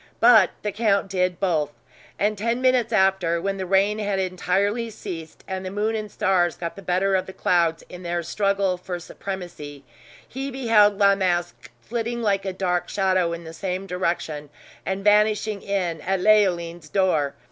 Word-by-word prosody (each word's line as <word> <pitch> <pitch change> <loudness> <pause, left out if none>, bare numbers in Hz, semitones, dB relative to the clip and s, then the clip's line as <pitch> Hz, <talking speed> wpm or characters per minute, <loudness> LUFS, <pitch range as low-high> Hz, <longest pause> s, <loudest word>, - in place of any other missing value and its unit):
But 225 -5 +7
the 210 - -1
count 200 -2 +1
did 180 -2 0
both; 160 -7 +1 0.5
and 210 +1 +1
ten 230 +4 -1
minutes 255 -3 +2
after, 190 -5 +2
when 195 +3 -2
the 190 -1 -4
rain 200 +3 +2
had 205 -2 -1
entirely 190 +5 0
ceased, 175 -7 -8
and 190 -1 -4
the 185 - -4
moon 210 +3 -1
and 215 -2 -4
stars 185 -5 +1
got 170 -1 -5
the 195 - -9
better 190 +1 +1
of 185 - -1
the 190 - -8
clouds 170 -3 +1
in 180 - -10
their 175 -1 -2
struggle 195 0 0
for 180 0 -5
supremacy, 175 -6 -7 0.4
he 270 +2 -5
beheld 225 -6 +3
La 200 -1 +5
Masque 175 -3 -1
flitting 235 0 -3
like 200 -2 +1
a 190 - -1
dark 180 -2 -1
shadow 185 -3 +1
in 170 0 -5
the 160 0 -9
same 185 +2 -4
direction, 170 -5 -3 0.4
and 190 +1 -2
vanishing 210 0 +3
in 180 -5 -2
at 190 +1 -1
Leoline's 175 -5 +2
door. 160 -7 +1
190 Hz, 170 wpm, -23 LUFS, 175-210 Hz, 0.5 s, But